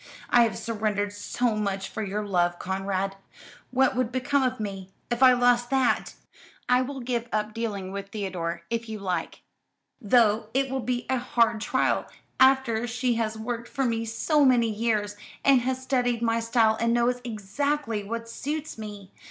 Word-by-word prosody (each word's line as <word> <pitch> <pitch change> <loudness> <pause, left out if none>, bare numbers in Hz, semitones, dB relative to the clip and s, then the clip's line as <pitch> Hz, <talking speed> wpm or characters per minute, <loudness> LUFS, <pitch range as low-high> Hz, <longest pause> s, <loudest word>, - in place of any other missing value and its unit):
I 240 - +7
have 225 - -3
surrendered 210 -3 -2
so 220 +3 -1
much 200 -2 -2
for 220 - -5
your 210 +1 -3
love, 175 -3 +1
Conrad. 195 +1 -2 0.5
What 265 +1 +2
would 250 -2 0
become 270 +3 +1
of 255 -1 0
me, 195 -3 -5 0.2
if 240 +1 -1
I 255 -1 +8
lost 245 -1 +3
that? 265 -2 +1 0.5
I 250 0 +4
will 265 +1 -4
give 240 -1 -2
up 215 0 -1
dealing 205 -5 -3
with 200 0 -6
Theodore, 185 -5 -4
if 230 -1 -2
you 220 - -4
like 180 -4 -3 0.6
though 220 -1 +3
it 270 -1 +1
will 265 - -1
be 245 -1 -2
a 260 -1 +1
hard 230 -2 +1
trial, - - +1 0.3
after 260 -3 +4
she 250 +1 0
has 220 0 -2
worked 235 +1 -4
for 270 -1 -1
me 230 -1 0
so 230 +7 +2
many 240 -4 +4
years, 210 -2 -1 0.3
and 270 -3 +6
has 260 +1 -2
studied 245 -3 0
my 230 0 +2
style 230 -1 +2
and 230 0 +2
knows 245 +1 +1
exactly 230 +2 -2
what 230 +3 -5
suits 295 +3 -5
me. 205 -3 -8
230 Hz, 170 wpm, -26 LUFS, 205-250 Hz, 0.6 s, I